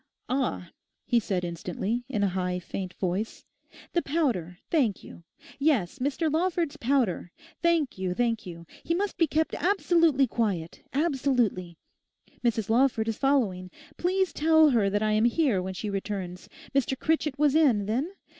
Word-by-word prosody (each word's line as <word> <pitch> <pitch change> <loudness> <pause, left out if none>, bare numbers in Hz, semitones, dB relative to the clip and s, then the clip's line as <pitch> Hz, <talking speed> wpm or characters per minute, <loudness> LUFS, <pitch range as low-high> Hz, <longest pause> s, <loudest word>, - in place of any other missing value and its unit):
'Ah,' 250 -9 -2 0.3
he 240 - +3
said 190 -4 -2
instantly, 185 +7 -3
in 210 -6 0
a 200 - +3
high 180 -1 -1
faint 180 +1 -6
voice, 190 +4 -3 0.5
'the 345 - +2
powder, 240 - -1
thank 250 - +1
you; 170 - -12 0.4
yes, 275 - +1
Mr 290 +4 0
Lawford's 335 -2 0
powder; 240 - 0 0.3
thank 335 - +1
you, 185 -1 -2
thank 230 -1 0
you. 170 -3 -9 0.2
He 335 - 0
must 400 +3 -1
be 330 - +2
kept 315 +2 0
absolutely 335 -7 +3
quiet—absolutely. 230 - -1 0.7
Mrs 225 -3 +1
Lawford 230 -1 +2
is 225 - -3
following. 220 -10 +1 0.3
Please 375 +1 0
tell 315 -1 +5
her 215 -5 +3
that 205 +2 0
I 215 - +1
am 215 +2 +3
here, 240 - +2
when 190 +1 -5
she 210 - -4
returns. 190 -2 -5 0.2
Mr 270 -1 +1
Critchett 310 -1 0
was 295 -1 +3
in, 265 -10 +4
then? 255 - -1
240 Hz, 150 wpm, -27 LUFS, 190-300 Hz, 0.7 s, tell